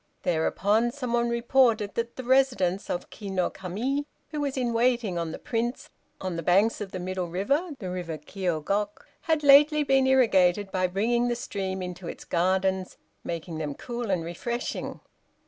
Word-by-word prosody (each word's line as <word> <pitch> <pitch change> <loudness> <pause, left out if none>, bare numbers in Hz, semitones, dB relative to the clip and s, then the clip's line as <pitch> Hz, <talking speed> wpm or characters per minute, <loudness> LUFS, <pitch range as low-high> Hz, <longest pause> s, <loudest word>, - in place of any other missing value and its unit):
Thereupon 200 +7 +2
some 250 -2 -4
one 235 0 +2
reported 235 -3 +2
that 235 0 -3
the 260 - -6
residence 245 -8 +2
of 175 - -3
Ki 205 -2 -8
no 185 -2 0
Kami, 235 +11 -3 0.2
who 300 -2 -3
was 280 -2 -2
in 245 -2 0
waiting 235 -6 +1
on 165 -1 -3
the - - -6
Prince, 235 +2 -3 0.3
on 185 -3 -3
the - - -2
banks 195 +7 +3
of 195 -2 -5
the - - -4
middle 185 0 -3
river 275 - 0
(the 190 - -6
River 175 -3 -4
Kiôgok) 190 +5 -2 0.2
had 320 -2 0
lately 295 +2 +7
been 270 -1 +3
irrigated 205 -7 +4
by 185 -1 +1
bringing 235 +6 +1
the 240 - 0
stream 190 -5 -4
into 180 -1 -6
its - - -7
gardens, 190 +1 0 0.3
making 165 -1 -5
them 150 -2 -3
cool 240 -2 -5
and 180 -4 +1
refreshing. 235 +9 -4
205 Hz, 170 wpm, -27 LUFS, 180-245 Hz, 0.3 s, lately